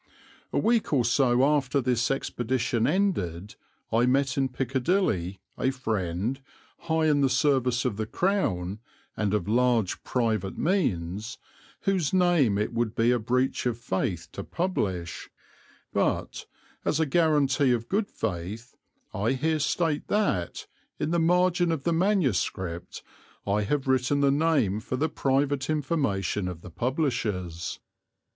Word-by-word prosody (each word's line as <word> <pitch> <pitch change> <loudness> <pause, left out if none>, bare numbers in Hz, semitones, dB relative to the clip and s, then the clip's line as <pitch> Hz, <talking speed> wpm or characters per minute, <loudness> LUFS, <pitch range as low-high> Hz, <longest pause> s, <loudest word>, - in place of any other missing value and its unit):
A - - -1
week 230 0 +2
or 125 -4 +3
so 125 0 +3
after 140 -2 +2
this 125 -2 +1
expedition 120 -3 0
ended 105 - -1 0.4
I 115 +2 +3
met 135 +1 +2
in 135 -1 +1
Piccadilly 125 - 0 0.2
a 130 - +2
friend, 110 -1 -2 0.4
high 160 -1 0
in 150 -2 +3
the 135 - +3
service 130 -2 +2
of 115 -5 -1
the 110 -1 -2
Crown 105 - 0 0.4
and 105 -2 0
of 100 -3 -2
large 120 -3 +1
private 110 -6 -1
means, 105 - -1 0.4
whose 190 -6 0
name 175 - +3
it 105 - -1
would 115 -2 -1
be 115 +1 +3
a 125 - +2
breach 125 +3 0
of 120 -2 -1
faith 95 -6 -2
to - - -6
publish; 95 - -3 0.6
but, - - -1 0.4
as 155 - 0
a 160 - +3
guarantee 145 -4 +3
of 115 -1 0
good 200 +1 0
faith, 105 +5 -5 0.4
I 110 +6 0
here 155 +4 0
state 155 +1 0
that, 195 - 0 0.3
in 150 +1 -2
the 170 - +2
margin 175 +1 +3
of 155 -4 -2
the 170 - +1
manuscript, 120 - 0 0.4
I 105 +1 +1
have 135 +6 -1
written 130 +2 +2
the 140 -1 +4
name 140 -9 +2
for 120 - -4
the 155 +5 0
private 140 0 0
information 135 - 0
of 90 -2 -6
the 90 - -11
publishers. 105 - -2
130 Hz, 140 wpm, -27 LUFS, 105-150 Hz, 0.6 s, the